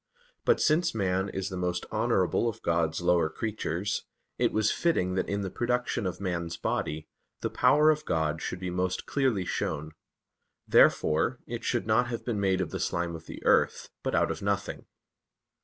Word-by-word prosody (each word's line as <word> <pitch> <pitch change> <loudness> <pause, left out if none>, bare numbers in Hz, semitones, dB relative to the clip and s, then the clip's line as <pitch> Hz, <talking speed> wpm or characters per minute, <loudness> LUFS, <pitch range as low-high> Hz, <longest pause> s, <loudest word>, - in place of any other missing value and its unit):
But 470 - +4
since 155 -3 +2
man 95 -1 0
is 95 0 -3
the 95 - -5
most 90 0 -1
honorable 110 -1 +1
of 115 0 -8
God's 85 -1 +1
lower 85 -2 +3
creatures, 105 0 -2 0.4
it - - +3
was 110 -1 +2
fitting 95 - +1
that 95 - -1
in 100 0 -1
the 95 -2 -4
production 120 -3 -1
of 90 -1 -4
man's 85 -3 -3
body, 80 0 -2 0.3
the - - -2
power 150 +1 +5
of 150 0 -2
God 80 -1 0
should 90 - -4
be 90 -1 -4
most 90 +1 -1
clearly 130 -9 +1
shown. 75 -2 -2 0.8
Therefore 80 +11 +4
it 120 0 -6
should 120 - 0
not 110 +3 +3
have 120 -2 -5
been 115 -4 -1
made 95 -1 +2
of 85 -4 -3
the - - -4
slime 85 -1 -1
of 80 0 -11
the - - -9
earth, - - +3
but - - -1
out - - +2
of - - -5
nothing. 100 0 -2
95 Hz, 180 wpm, -28 LUFS, 85-115 Hz, 0.8 s, power